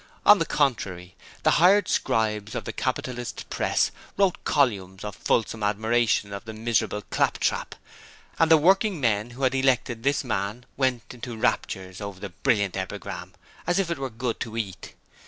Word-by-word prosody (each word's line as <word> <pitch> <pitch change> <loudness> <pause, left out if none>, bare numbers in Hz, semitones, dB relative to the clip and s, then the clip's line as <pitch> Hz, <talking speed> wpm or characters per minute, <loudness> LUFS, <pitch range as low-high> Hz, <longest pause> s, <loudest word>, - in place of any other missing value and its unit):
On 210 - +8
the 165 - 0
contrary, 100 -11 -1 0.3
the - - +4
hired 195 +2 +6
scribes 105 -1 0
of - - -4
the - - -4
capitalist 125 -1 -3
Press - - +1 0.3
wrote 195 -3 +2
columns 100 -10 +1
of 105 -1 -5
fulsome 115 0 0
admiration 110 0 +1
of 100 - -6
the 110 0 -7
miserable 110 -2 0
claptrap, - - 0 0.6
and 165 - +4
the 160 - +8
working 190 +3 +3
men 110 -3 +1
who 125 +3 -8
had 130 0 +3
elected 130 -3 +1
this 140 +4 +1
man 110 0 -3
went 130 -3 -1
into 120 -1 -7
raptures 95 -3 -1
over 100 -2 -6
the 100 - -6
'Brilliant 100 +2 0
Epigram' 95 -1 -5 0.3
as 175 - +2
if 190 -4 +1
it 170 - -2
were 135 -1 -3
good 115 +1 -3
to 115 -1 -5
eat. 95 -4 -5
115 Hz, 165 wpm, -25 LUFS, 100-135 Hz, 0.6 s, On